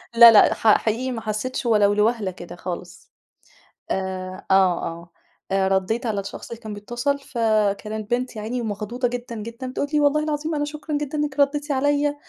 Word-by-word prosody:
لأ، 235 0 +11
لأ 210 - +6
ح 220 -2 +4
حقيقي 235 +4 -1
ما 230 -3 -4
حسيتش 220 +5 -3
ولو 210 -3 +4
لوهلة 210 -1 +1
كده 175 -1 -10
خالص، 180 0 -8 0.8
آآ 185 -1 -4
آه، - - +6
آه 170 -2 +1 0.4
آآ 195 0 +2
رديت 195 +6 0
على 210 -3 -1
الشخص 195 - -7
اللي 235 - -7
كان 215 -1 -6
بيتصل 240 +7 -2
فكانت 215 -3 -1
بنت 245 0 -1
يا 215 - -5
عيني 240 +4 -3
ومخضوضة 225 +3 -2
جدًا، 240 -1 -5
جدًا 230 +4 -6
بتقول 260 +2 -2
لي 300 - +4
والله 295 +1 +3
العظيم 305 +1 -2
أنا 295 0 0
شكرًا 300 0 -4
جدًا 295 0 -4
إنِّك 295 -1 -2
رديتِ 290 +1 +1
عليّا، 290 +1 +1
230 Hz, 180 wpm, -23 LUFS, 205-275 Hz, 0.8 s, لأ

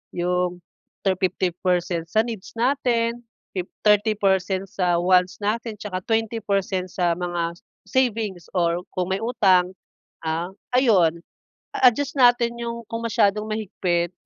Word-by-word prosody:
yung 180 0 0 0.4
thir 190 -1 +2
50 185 0 0
percent 175 -2 0
sa 220 +6 +2
needs 230 -2 -7
natin, 235 -2 +1 0.4
fifth 185 -1 -4
30 210 +1 +4
percent 190 -1 +1
sa 180 -2 +1
wants 180 +1 +3
natin 220 +2 -1
tsaka 195 -4 -4
20 225 0 0
percent 195 -2 -1
sa 175 -2 +1
mga 170 -1 -2 0.3
savings 220 -6 0
or 170 0 +1
kung 185 0 -1
may 190 - 0
utang, 190 -6 +3 0.5
ah, 165 +3 -2 0.2
ayun. 190 -10 +4 0.6
A 255 - +6
adjust 280 +3 -4
natin 240 -1 +4
yung 235 0 -4
kung 230 0 -3
masyadong 210 -1 +2
mahigpit, 180 -5 -1
195 Hz, 135 wpm, -23 LUFS, 180-230 Hz, 0.6 s, A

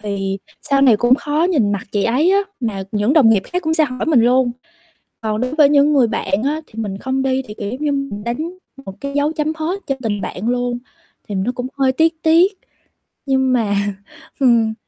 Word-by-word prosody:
thì 195 -2 -3 0.2
sau 275 -1 +1
này 240 -6 +6
cũng 240 +3 +4
khó 295 +4 -1
nhìn 225 - +2
mặt 200 - -2
chị 205 -1 0
ấy 285 +10 +2
á, 395 - +4 0.2
mà 205 -5 -2
những 210 +5 +1
đồng 280 -8 +6
nghiệp 200 -4 +3
khác 360 +1 -3
cũng 320 0 0
sẽ 315 -2 +3
hỏi 255 +2 -4
mình 290 -7 +4
luôn. 245 +1 +3 0.7
Còn 215 0 -2
đối 255 +3 -2
với 300 -3 +5
những 290 +1 +4
người 265 -5 +4
bạn 195 -1 -1
á 300 +3 -1
thì 225 - -14
mình 200 -2 -4
không 265 +2 -2
đi 265 0 0
thì, 210 - -8
kiểu, 205 -1 -5
giống 255 +4 -6
như 295 -1 0
mình 275 -8 -4
đánh 315 +10 -4 0.3
một 190 - -7
cái 280 0 -4
dấu 290 +2 +1
chấm 310 0 -1
hết 345 +5 -3
cho 275 - 0
tình 205 -3 -2
bạn 205 +4 -4
luôn. 245 0 -1 0.5
Thì 205 - -4
nó 195 +6 -1
cũng 250 +1 -4
hơi 265 -1 +3
tiếc 325 +4 +2
tiếc 335 +5 +4 0.7
nhưng 265 -2 +2
mà 220 -5 +1 0.6
ừm. 235 -4 +3
255 Hz, 220 wpm, -18 LUFS, 220-295 Hz, 0.7 s, này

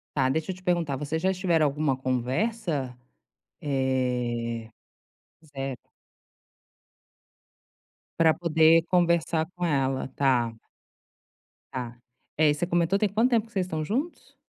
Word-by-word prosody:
Tá. 135 -3 +2
Deixa 160 +6 -1
eu - - -6
te 185 - -16
perguntar, 170 -6 0
vocês 150 +4 -3
já 190 - +2
estiveram 175 -4 +2
alguma 145 -1 0
conversa? 130 - -2 0.6
Eh 125 -4 -1 0.7
certo. 135 -4 -7 2.3
Pra 160 -1 +5
poder 165 0 +4
conversar 170 -2 +2
com 180 - -2
ela. 135 -4 0
Tá. 125 -4 +2 1.2
Tá. 125 -3 -5 0.4
É, 155 -1 +4
você 160 +4 -2
comentou, 175 +3 +1
tem 210 - +3
quanto 225 +5 +2
tempo 230 -3 +2
que 225 - -23
vocês 190 -2 0
estão 160 -3 -3
juntos? 275 - -4
155 Hz, 120 wpm, -26 LUFS, 130-175 Hz, 2.3 s, Pra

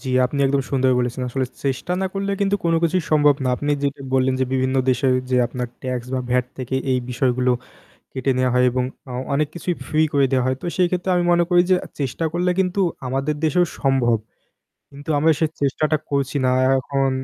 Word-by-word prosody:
জ্বী, 130 - -5 0.2
আপনি 140 +3 -5
একদম 135 0 +1
সুন্দর 130 -2 +2
বলেছেন 125 +1 -2
আসলে 130 +1 -1 0.2
চেষ্টা 135 +6 -1
না 190 - 0
করলে 195 0 -2
কিন্তু 200 0 +2
কোনো 165 0 +3
কিছুই 175 +2 +2
সম্ভব 145 -1 +5
না - - +1
আপনি 145 +2 -2
যেটা 140 0 -2
বললেন 130 0 +2
যে - - +3
"বিভিন্ন 130 0 +1
দেশে 130 +1 +2 0.2
যে 130 - +2
আপনার 125 0 -4 0.2
ট্যাক্স 125 -2 -3
বা 130 - 0
ভ্যাট 125 0 +2
থেকে 130 0 -4 0.2
এই 130 - +2
বিষয়গুলো 125 0 +1 0.6
কেটে 130 0 -1
নেওয়া 130 0 +2
হয় 125 0 +4
এবং 125 +1 0 0.3
আ - - -5 0.2
অনেক 150 +1 +1
কিছুই 175 +1 -2
ফ্রি 155 - +1
করে 140 -2 +3
দেওয়া 130 -2 +2
হয়।" 130 0 0
তো - - -4
সেই 180 - +4
ক্ষেত্রে 180 +1 -1
আমি 175 - +1
মনে 175 0 +4
করি 175 0 +5
যে - - +7 0.3
চেষ্টা 135 +4 -2
করলে 175 +1 +1
কিন্তু 185 +1 0 0.3
আমাদের 135 +4 -1
দেশেও 175 +3 +3 0.2
সম্ভব 130 -4 +2 0.8
কিন্তু 145 +3 -11
আমরা 160 +3 +4
সেই 160 - +2
চেষ্টাটা 155 +3 +1
করছি 140 0 -1
না - - +3 0.2
আর - - +3
এখন 135 +1 0
135 Hz, 210 wpm, -21 LUFS, 130-160 Hz, 0.8 s, যে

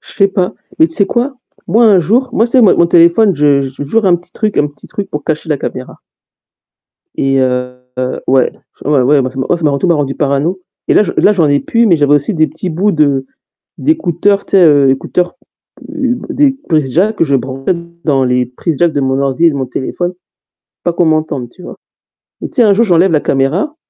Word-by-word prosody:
Je - - -11
sais 195 -1 +2
pas. 185 -2 -2 0.2
Mais 160 - +5
tu 165 - -7
sais 200 - +2
quoi? 255 +3 -1 0.3
Moi 225 +7 +3
un 205 -4 +5
jour, 235 - +1
moi 225 -1 +2
c'est 250 +2 +2
mon 205 - +4
mon 170 - +4
téléphone, 170 +4 +4
je 145 -1 +2
je 135 - -3
j'ai 135 - -8
toujours 200 +9 0
un 175 - +4
petit 175 +1 -7
truc 215 -2 -2
un 150 - +2
petit 145 - -15
truc 205 - -6
pour 150 -1 -5
cacher 160 0 -3
la 150 - 0
caméra. 130 0 -7 1.2
Et 135 0 0
heu, 125 -1 -1 0.5
ouais, 130 -1 +2 0.3
ouais, 145 -1 +2
ouais, 140 +2 +3
moi 130 - -3
ça 130 - -10
m'a 135 +6 0
ça 165 - -6
m'a 150 - +3
rend 140 - -1
tout - - -1
m'a 170 - +3
rendue 140 -3 -2
parano. 145 +6 -1 0.3
Et - - +3
là - - +5
je - - -3
là, 210 - +4
j'en 170 -7 +1
ai 145 0 +2
plus, 235 0 +1
mais 175 -5 +4
j'avais 145 -1 +2
aussi 145 +8 0
des 155 -1 +2
petits 160 +5 -6
bouts 195 +6 0
de 140 -4 +1 0.5
d'écouteurs, 200 - 0
tu - - -14
sais, 190 -3 +5
heu, 145 -3 +4
écouteurs, 175 - -1 0.6
heu, 265 -5 -2
des 275 -2 +1
prises 155 -6 0
jack 205 - +1
que - - +2
je 140 -3 +1
branchais 135 +5 -3 0.3
dans 135 -3 +1
les 125 0 0
prises 135 +5 -4
jack 170 -2 +2
de 145 - -1
mon 135 0 0
ordi 140 +5 +1
et - - +5
de 140 - -5
mon 130 - -3
téléphone, 175 +8 -4 0.7
pas 175 - 0
qu'on 170 +1 +1
m'entende, 155 -6 -1
tu 180 - -16
vois. - - -9 0.7
Bah, - - -4
tiens, 235 -5 +3
un 200 - +5
jour, 235 +4 +2
j'enlève 180 -1 +3
la 155 -2 +2
caméra, 155 - -1
160 Hz, 235 wpm, -13 LUFS, 140-195 Hz, 1.2 s, Mais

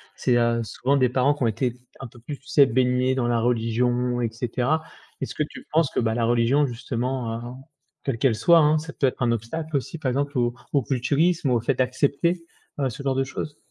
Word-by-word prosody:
C'est, 120 -1 +2
heu, 115 0 +2
souvent 130 +5 -1
des 130 -3 +3
parents 130 +3 +2
qui 145 - -4
ont - - +3
été 115 +3 -1 0.3
un 135 - -7
peu 120 - -16
plus, 140 +5 -7
tu 135 - -24
sais, 140 +1 +6
baignés 125 +1 +2
dans 130 -2 0
la 120 -1 +1
religion 120 +1 +1
et 115 - 0
cetera. 125 +6 -1 0.4
Est-ce - - -5
que - - +1
tu 150 - -10
penses 160 -2 +3
que, - - -1
bah, 110 -1 0
la 120 - 0
religion 120 +5 +3
justement, 120 -1 -3
heu, 115 - -5 0.6
quelle 135 -4 -1
qu'elle 125 -1 +2
soit 170 +9 +5
hein, 155 0 +4
ça 160 +1 -6
peut - - 0
être 130 - -4
un 120 -1 +2
obstacle 155 +8 -4
aussi? 140 +4 -2
Par 140 -5 -2
exemple, 140 +2 -1
au 120 -1 +1 0.2
au 140 - +3
culturisme 140 +5 +1
ou 125 - +3
au 115 - +2
fait 130 +4 0
d'accepter, 140 +7 0 0.3
heu, 135 -2 +1
ce 125 +3 -8
genre 135 -1 0
de 135 - +1
choses? 145 +2 -6
130 Hz, 230 wpm, -24 LUFS, 120-140 Hz, 0.6 s, sais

